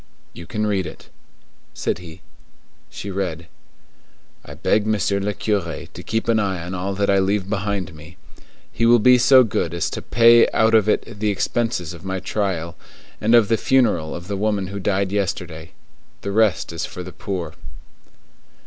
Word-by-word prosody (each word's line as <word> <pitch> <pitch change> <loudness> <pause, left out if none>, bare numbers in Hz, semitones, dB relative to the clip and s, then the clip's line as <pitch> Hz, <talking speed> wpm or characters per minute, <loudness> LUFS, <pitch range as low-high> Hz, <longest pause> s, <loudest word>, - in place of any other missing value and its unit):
"You 85 - -10
can 105 -1 -2
read 100 -4 0
it," 80 - -12 0.7
said - - -2
he. 85 0 -12 0.7
She 100 - -7
read:— 90 -4 -3 1.0
"I - - -10
beg 105 0 +1
Monsieur 100 -2 +1
le 100 +1 -1
Curé 100 -6 -3
to - - -8
keep 110 0 -2
an 115 -1 +3
eye 95 -5 -1
on 90 - -6
all 95 +2 -3
that 100 +1 0
I 100 - +4
leave 95 0 0
behind 100 -4 -2
me. 80 +4 -14 0.6
He 115 - +2
will 120 +1 +7
be 125 +3 +5
so 130 +1 +7
good 85 -7 -2
as 85 - -1
to - - -5
pay 115 +1 +5
out 110 +1 +3
of 110 -2 +4
it 105 - -1
the 105 0 +1
expenses 100 -3 -1
of 85 - -12
my 95 0 -3
trial, 90 -5 -2 0.5
and 115 +3 +4
of 115 -3 +5
the 115 +1 +2
funeral 115 -14 +1
of 85 0 -8
the 100 - -3
woman 100 -2 -1
who 100 0 -5
died 95 0 0
yesterday. 90 -5 -3 0.5
The 100 - -4
rest 105 -5 +1
is 85 - -4
for 90 - -6
the 90 +1 -9
poor." 95 -3 -5
100 Hz, 180 wpm, -21 LUFS, 90-110 Hz, 1.0 s, will